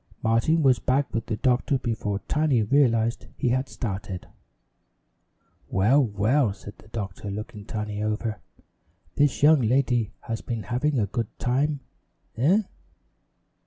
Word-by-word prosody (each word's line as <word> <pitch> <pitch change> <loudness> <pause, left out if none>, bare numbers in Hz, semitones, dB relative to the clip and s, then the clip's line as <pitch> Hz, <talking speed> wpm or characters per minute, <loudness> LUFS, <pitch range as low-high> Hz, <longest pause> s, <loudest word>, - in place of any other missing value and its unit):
Martin 115 +9 +2
was 130 -3 +4
back 135 +2 0
with 115 0 -2
the 110 - -2
doctor 130 +2 +2
before 110 -5 -2
Tiny 150 -7 +2
realized 115 -2 +2
he 125 - +1
had 130 +2 0
started. 95 -5 -5 1.4
"Well, 120 +10 +4
well," 110 +2 +1
said 100 0 -12
the - - -17
doctor, 105 -2 -5
looking 105 0 -6
Tiny 105 -1 -4
over, 110 0 -2 0.7
"this 145 -1 +1
young 155 -1 +7
lady 120 -2 +2
has 115 -2 -4
been 115 -3 -4
having 130 +7 0
too 110 -5 +2
good 115 +2 -2
a - - -38
time 140 +3 +1 0.5
eh?" 175 - +3
120 Hz, 135 wpm, -25 LUFS, 105-135 Hz, 1.4 s, young